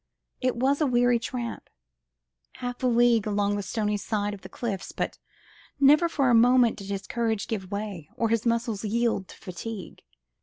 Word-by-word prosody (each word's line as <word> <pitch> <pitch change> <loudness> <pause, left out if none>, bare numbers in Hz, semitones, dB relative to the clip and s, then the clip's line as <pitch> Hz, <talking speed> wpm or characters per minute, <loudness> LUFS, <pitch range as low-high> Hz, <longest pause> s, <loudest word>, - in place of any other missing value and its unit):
It 255 0 +1
was 270 +5 +1
a 300 - +3
weary 245 -1 +3
tramp, 235 0 -5 0.8
half 245 0 -6
a 255 - +2
league 235 -2 +4
along 205 -1 +1
the 205 - -2
stony 210 +1 -1
side 205 0 -2
of 200 - -9
the - - -10
cliffs, 200 -6 -4
but - - -3 0.6
never 295 +5 +6
for 275 -6 +2
a - - +4
moment 245 0 +5
did 200 -2 -8
his 200 0 -3
courage 225 -3 -1
give 195 -5 -4
way 200 -6 -5
or 230 - 0
his 230 0 +1
muscles 230 -3 0
yield 225 -2 0
to - - -13
fatigue. 195 +3 -7
230 Hz, 180 wpm, -26 LUFS, 205-245 Hz, 0.8 s, never